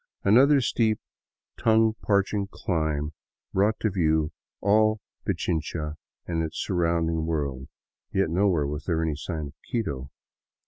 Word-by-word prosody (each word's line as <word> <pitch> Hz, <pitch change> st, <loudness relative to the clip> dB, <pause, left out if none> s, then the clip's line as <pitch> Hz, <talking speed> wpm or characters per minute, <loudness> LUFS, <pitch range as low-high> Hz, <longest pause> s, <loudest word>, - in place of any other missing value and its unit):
Another 135 Hz, +7 st, +6 dB
steep, 110 Hz, -3 st, +1 dB, 0.6 s
tongue 110 Hz, -1 st, +4 dB
parching 100 Hz, 0 st, +1 dB
dimb 80 Hz, -6 st, -1 dB, 0.4 s
brought 105 Hz, +3 st, +2 dB
to 110 Hz, -, +1 dB
view 80 Hz, -3 st, +2 dB, 0.3 s
all 110 Hz, +2 st, +3 dB, 0.3 s
Pichincha 80 Hz, -2 st, -1 dB, 0.3 s
and 85 Hz, -1 st, -1 dB
its 80 Hz, 0 st, -4 dB
surrounding 85 Hz, -3 st, 0 dB
world, 70 Hz, -5 st, -2 dB, 0.4 s
yet 95 Hz, -4 st, +1 dB
nowhere 90 Hz, -4 st, +2 dB
was 75 Hz, +2 st, -4 dB
there 80 Hz, -2 st, +1 dB
any 80 Hz, -2 st, 0 dB
sign 80 Hz, -1 st, -4 dB
of -, -, -15 dB, 0.2 s
Quito. 70 Hz, -, -2 dB
85 Hz, 125 wpm, -26 LUFS, 80-105 Hz, 0.6 s, Another